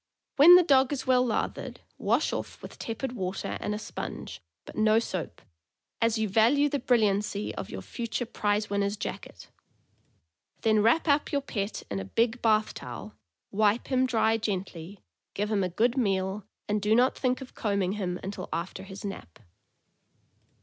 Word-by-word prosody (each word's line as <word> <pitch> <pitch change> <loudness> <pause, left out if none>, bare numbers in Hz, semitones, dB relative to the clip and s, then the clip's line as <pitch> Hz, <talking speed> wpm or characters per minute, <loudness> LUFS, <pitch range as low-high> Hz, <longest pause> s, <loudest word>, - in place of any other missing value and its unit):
When 330 +6 +10
the 360 - +7
dog 270 -4 +4
is 265 -2 -3
well 255 -1 +4
lathered, 235 -3 -3 0.2
wash - - +1
off - - -5
with - - -10
tepid 235 +3 -4
water 190 -5 -3
and 210 - -2
a - - -3
sponge, 215 - -7 0.2
but - - -11
no 215 0 +4
soap, 185 -7 -3 0.6
as 230 0 +2
you 220 0 0
value 235 +9 +4
the 285 0 -1
brilliancy 210 -4 +1
of - - -6
your - - -6
future 235 +1 -4
prize 210 -2 0
winner's 200 0 -1
jacket; 185 - -7 1.1
then 215 -1 +3
wrap 235 +11 +3
up 290 0 +2
your 285 - +1
pet 205 -6 -4
in 100 - -1
a 95 - -5
big 230 - 0
bath 215 -1 +2
towel, 120 -4 -8 0.4
wipe 210 +2 +2
him 260 0 +3
dry 225 -2 +2
gently, 190 -3 -5 0.3
give 210 +2 -1
him 200 -2 +2
a 180 - -1
good 235 +8 +1
meal, 195 -4 0 0.2
and 210 0 0
do 210 +2 +3
not 250 +2 +4
think 255 -1 0
of 265 -2 -10
combing 200 -4 0
him 185 -3 -3
until 190 -1 -6
after 170 +3 -4
his 195 +1 -9
nap. 140 - -7
215 Hz, 170 wpm, -28 LUFS, 195-245 Hz, 1.1 s, When